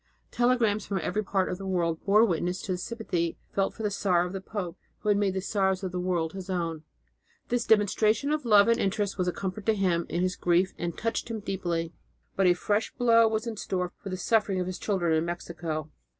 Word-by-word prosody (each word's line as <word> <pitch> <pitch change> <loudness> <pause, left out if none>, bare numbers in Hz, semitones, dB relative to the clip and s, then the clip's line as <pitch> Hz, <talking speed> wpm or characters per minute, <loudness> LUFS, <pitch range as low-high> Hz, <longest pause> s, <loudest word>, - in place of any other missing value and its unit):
Telegrams 240 -4 +2
from 200 - -2
every 210 +4 -1
part 195 -1 0
of 180 - -4
the 195 - -6
world 170 -3 0
bore 210 +3 +5
witness 180 -1 -1
to 190 - -3
the 180 - 0
sympathy 180 -6 -2 0.2
felt 195 -1 +1
for 220 - -6
the 210 - 0
sorrow 180 -3 +2
of 180 - -6
the 195 - -4
pope 190 -4 -5 0.3
who 210 - -1
had 205 - +4
made 195 -2 +1
the 190 - -1
sorrows 190 -1 0
of 185 - -2
the 180 - -3
world 175 -3 -1
his 190 0 -7
own. 165 -4 -2 0.7
This 240 -1 0
demonstration 215 +5 +3
of 305 -1 0
love 210 -3 +6
and 230 0 +3
interest 200 0 -1
was 180 - +1
a - - +2
comfort 195 +3 -5
to 220 - +4
him 180 -4 +1
in 175 - 0
his 185 0 0
grief 180 +2 +2
and 170 -1 -3
touched 230 +1 -2
him 225 -1 -3
deeply. 175 -5 -2 0.4
But 195 -1 +3
a 175 - +5
fresh 205 +4 0
blow 230 -2 +5
was 220 +1 -1
in 230 -2 -4
store 180 -3 -2
in 195 - -5
the 185 - -3
sufferings 200 -1 +1
of - - -1
his 185 0 -5
children 180 -6 0
in 160 - +2
Mexico. 165 -2 -4
190 Hz, 230 wpm, -28 LUFS, 175-215 Hz, 0.7 s, love